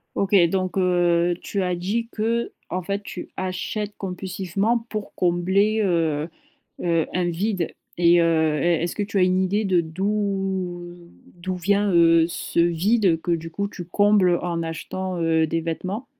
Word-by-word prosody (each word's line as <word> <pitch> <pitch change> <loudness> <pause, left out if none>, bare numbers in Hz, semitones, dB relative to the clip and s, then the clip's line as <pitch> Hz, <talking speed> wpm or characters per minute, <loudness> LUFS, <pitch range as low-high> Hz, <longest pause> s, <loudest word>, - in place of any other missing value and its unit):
OK, 200 +1 0
donc 185 0 -2
heu, 175 -1 +2
tu 200 -2 -2
as 180 -1 0
dit, 220 +6 -2
qu'en 225 -5 -3
fait, 200 +3 -3
tu 180 - -8
achètes 195 +3 -3
compulsivement 195 +3 -1
pour 215 -2 -5
combler, 190 +5 +2
heu 165 -4 0 0.5
heu, 165 -2 +1
un 180 -1 0
vide. 185 0 -2 0.3
Et 170 0 +5
heu, 160 -2 +2
est 170 -1 +2
est-ce 170 - -2
que 210 - -1
tu 200 0 -2
as - - +4
une 185 +1 +3
idée 205 +3 0
de 185 -3 +3
d'où 190 -1 -2 0.4
d'où 185 +1 -4
vient, 200 +2 +1
heu, 165 -1 +5
ce 170 - -4
vide 175 +1 +2
que 175 - -4
du 165 0 -3
coup, 200 +4 -3
tu 180 -3 -8
combles 195 -1 +3
en 170 -1 -2
achetant, 175 +2 -4
heu, 160 -1 +2
des 165 +1 -1
vêtements? 185 - -4
180 Hz, 160 wpm, -23 LUFS, 170-200 Hz, 0.5 s, Et